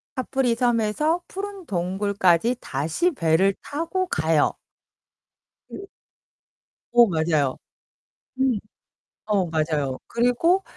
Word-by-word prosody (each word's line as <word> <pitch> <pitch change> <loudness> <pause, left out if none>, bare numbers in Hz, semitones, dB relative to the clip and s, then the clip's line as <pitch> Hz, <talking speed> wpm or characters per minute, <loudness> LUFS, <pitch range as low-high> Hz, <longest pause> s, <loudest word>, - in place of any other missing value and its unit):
카프리섬에서 250 +4 +1
푸른 395 -1 -7
동굴까지 195 - +1
다시 160 - -1
배를 185 - +2
타고 335 +5 -2
가요. 160 - +2 1.2
그 395 - -8 1.1
어, 240 0 +7
맞아요. 160 -6 0 0.8
음. 260 -4 +2 0.7
어, 205 -4 +1
맞아요. 155 -5 -1
그리고 245 +11 +2
210 Hz, 185 characters per minute, -24 LUFS, 165-270 Hz, 1.2 s, 어